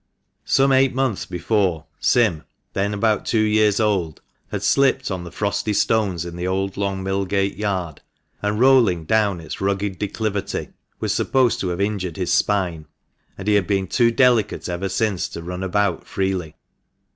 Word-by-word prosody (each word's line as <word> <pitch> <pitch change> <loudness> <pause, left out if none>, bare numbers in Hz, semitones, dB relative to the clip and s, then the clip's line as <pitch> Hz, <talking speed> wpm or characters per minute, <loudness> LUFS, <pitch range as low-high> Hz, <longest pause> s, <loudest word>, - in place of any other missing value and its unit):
Some 135 0 +3
eight 130 -1 +3
months 130 -6 -1
before, 90 -2 0
Sim 105 -11 +2 0.3
(then 100 +1 0
about 105 +1 +1
two 115 - 0
years 105 -1 +3
old) 95 -8 0 0.3
had 105 -1 -4
slipped 130 +2 +2
on 90 -2 -3
the 85 - -9
frosty 100 +1 -1
stones 100 -6 +1
in 85 -1 -7
the 90 +1 -3
old 95 +1 -1
Long 95 -1 -2
Millgate 95 0 -1
Yard, 95 -7 -3 0.4
and, 105 +1 -1
rolling 120 -10 +4
down 105 -2 +1
its 80 +2 -8
rugged 100 -1 -1
declivity, 105 -1 -3 0.3
was - - -1
supposed 125 -3 +2
to 95 - -2
have 90 0 -3
injured 100 -4 -2
his 90 -2 0
spine, 90 -7 0 0.5
and 95 - -7
he 105 - +4
had 100 -4 +2
been 95 -2 +1
too 120 +5 +3
delicate 120 -4 +2
ever 90 +2 -3
since 100 -1 0
to 85 - -7
run 90 +2 -5
about 95 -1 0
freely. 95 -5 -2
100 Hz, 165 wpm, -21 LUFS, 90-110 Hz, 0.5 s, rolling